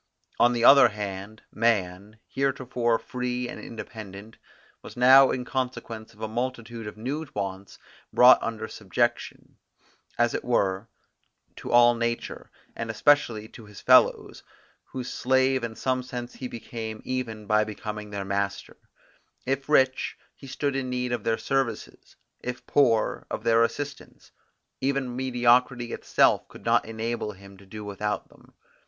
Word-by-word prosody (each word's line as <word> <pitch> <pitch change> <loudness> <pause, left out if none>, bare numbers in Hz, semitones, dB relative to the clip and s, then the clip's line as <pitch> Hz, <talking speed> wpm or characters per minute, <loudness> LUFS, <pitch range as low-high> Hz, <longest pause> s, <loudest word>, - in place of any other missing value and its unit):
On 120 +1 +5
the 120 -1 +1
other 140 -2 +9
hand, 105 0 -7
man, 105 -2 0
heretofore 130 -4 0
free 125 0 -4
and - - -8
independent, 110 -1 -9 0.4
was - - -12
now 130 +2 +7
in 125 -1 -2
consequence 125 -4 -4
of 110 - -18
a 110 - -2
multitude 115 -1 -4
of 105 - -8
new 140 +8 -4
wants 100 -1 -5 0.3
brought 125 +1 +7
under 110 -1 -4
subjection, 120 +4 -2 0.6
as 120 -1 +2
it - - -3
were, 100 -3 0 0.7
to - - -7
all 120 0 +6
nature, 115 0 -3 0.3
and 115 -1 -5
especially 110 -2 +2
to 115 - -13
his 105 -1 -12
fellows, - - +4 0.4
whose 125 -1 -6
slave 130 0 +1
in 115 -1 -4
some 130 +1 -1
sense 125 -1 -7
he 130 - -6
became 115 -2 -7
even 115 -4 -4
by 105 +1 +3
becoming 105 0 -6
their 100 -1 -5
master; 100 -1 -3 0.7
if 135 +2 -2
rich, 130 -3 +2 0.2
he 135 - -13
stood 140 +1 -2
in 135 -1 -2
need 125 0 -2
of 120 -3 -2
their 115 0 +1
services, 135 -3 -3 0.2
if 125 0 -6
poor, 120 -6 +2
of - - -4
their 115 0 +4
assistance; 140 +5 -5 0.5
even 135 -2 -1
mediocrity 125 -1 +2
itself - - +2
could - - -15
not - - +3
enable 115 -1 -4
him 100 0 -15
to 95 0 -18
do 105 +2 -8
without 105 0 -3
them. - - -22
115 Hz, 145 wpm, -26 LUFS, 110-125 Hz, 0.7 s, other